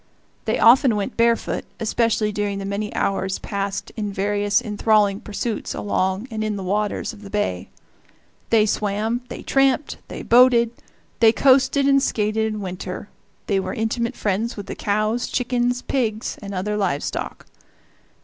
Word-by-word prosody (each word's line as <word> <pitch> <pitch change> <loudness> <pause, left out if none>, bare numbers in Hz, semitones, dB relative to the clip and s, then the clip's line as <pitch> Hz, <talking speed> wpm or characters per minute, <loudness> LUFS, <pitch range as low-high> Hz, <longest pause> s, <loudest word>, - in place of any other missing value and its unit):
They - - +1
often 240 0 +6
went 205 +4 -3
barefoot, 230 0 +1 0.2
especially 225 -1 +1
during 205 -1 -2
the 195 - -5
many 200 +1 -3
hours 190 -1 0
passed 200 -1 -4
in 210 -2 -3
various 205 +1 +1
enthralling 210 -3 +2
pursuits 215 +1 -4
along 190 +2 -1
and 220 -1 -2
in 215 -1 -1
the 195 - -5
waters 205 +4 -1
of 210 - -14
the 200 - -10
bay. 195 - -2 0.8
They 220 -2 +4
swam, 215 +3 -1
they - - -7
tramped, 270 +1 +1
they - - -7
boated, 240 -1 +5 0.5
they 225 -1 +7
coasted 270 +2 +4
and 275 0 +5
skated 220 -3 0
in 215 -1 -5
winter, 185 +1 -6 0.4
they 195 -2 +1
were 190 - -4
intimate 230 +1 -1
friends 215 +4 -1
with 200 - -6
the - - -5
cows, 215 +3 0
chickens, 245 0 0
pigs, 225 -5 -1
and 200 -1 -6
other 210 +3 -2
live 145 -9 0
stock. - - -5
215 Hz, 155 wpm, -22 LUFS, 200-235 Hz, 0.8 s, they